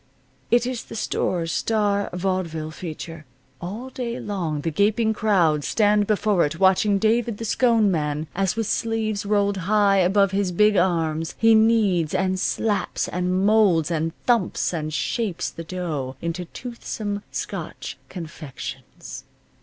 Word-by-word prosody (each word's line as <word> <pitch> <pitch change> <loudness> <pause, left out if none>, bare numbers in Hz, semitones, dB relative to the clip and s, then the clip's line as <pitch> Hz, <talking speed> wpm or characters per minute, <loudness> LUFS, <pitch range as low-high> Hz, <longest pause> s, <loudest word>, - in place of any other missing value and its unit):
It 240 0 +3
is 250 -2 -4
the - - -9
store's 170 -5 -1
star 205 -2 0
vaudeville 175 -4 -2
feature. 165 0 -7 0.4
All 220 +9 -6
day 245 -2 -4
long 170 -8 -3
the 165 - -2
gaping 215 +6 +2
crowd 175 -9 +2
stands 210 +1 +2
before 210 -3 +2
it, 150 +3 -2
watching 195 +2 +4
David 225 +1 +1
the 230 - -5
Scone 225 -3 +3
Man, 150 -2 -1
as 195 0 0
with 225 0 -1
sleeves 220 -2 -1
rolled 200 -1 +2
high 200 +2 +3
above 195 +1 +3
his 195 -1 0
big 210 +4 +4
arms, 165 -3 0
he 225 0 +5
kneads, 215 -7 +3
and 185 0 0
slaps, 210 +2 -1
and 180 +2 0
molds, 200 -7 +4
and 165 0 0
thumps 230 -7 +1
and 155 -2 -3
shapes 200 +2 -2
the 165 - -8
dough 160 -7 -4
into 170 +2 -3
toothsome 215 -2 -5
Scotch - - -5
confections. 145 -6 -8
195 Hz, 140 wpm, -23 LUFS, 165-215 Hz, 0.4 s, he